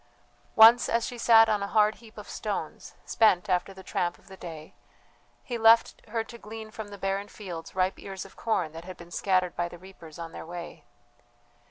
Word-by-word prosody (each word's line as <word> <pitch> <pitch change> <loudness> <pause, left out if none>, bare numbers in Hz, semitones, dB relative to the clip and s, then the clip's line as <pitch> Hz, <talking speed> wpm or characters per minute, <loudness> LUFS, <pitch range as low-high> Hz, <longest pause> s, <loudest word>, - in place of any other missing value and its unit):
Once 230 +2 +8
as 230 0 +1
she 245 - -6
sat 225 -1 +7
on 210 -2 +1
a 200 - -2
hard 215 0 +3
heap 225 -1 -16
of - - -9
stones, - - -5
spent 200 -6 +3
after 185 0 0
the 190 0 -12
tramp 175 -1 -2
of - - -22
the 190 - -10
day, 160 -4 -10 0.7
he 240 -2 -4
left 225 +1 +5
her 225 +1 -2
to 235 +1 -12
glean 220 0 -9
from 220 -1 -7
the 205 0 -10
barren 195 +1 -2
fields 180 -6 -9
ripe 185 0 0
ears 195 -1 -7
of 195 - -15
corn 190 -8 -1
that 165 +1 -9
had 185 -1 -9
been 170 0 -13
scattered 185 -2 0
by 175 0 -2
the 175 - -11
reapers 170 -3 -13
on 165 -1 -7
their - - -8
way. 175 +1 -9
195 Hz, 205 wpm, -27 LUFS, 175-220 Hz, 0.7 s, Once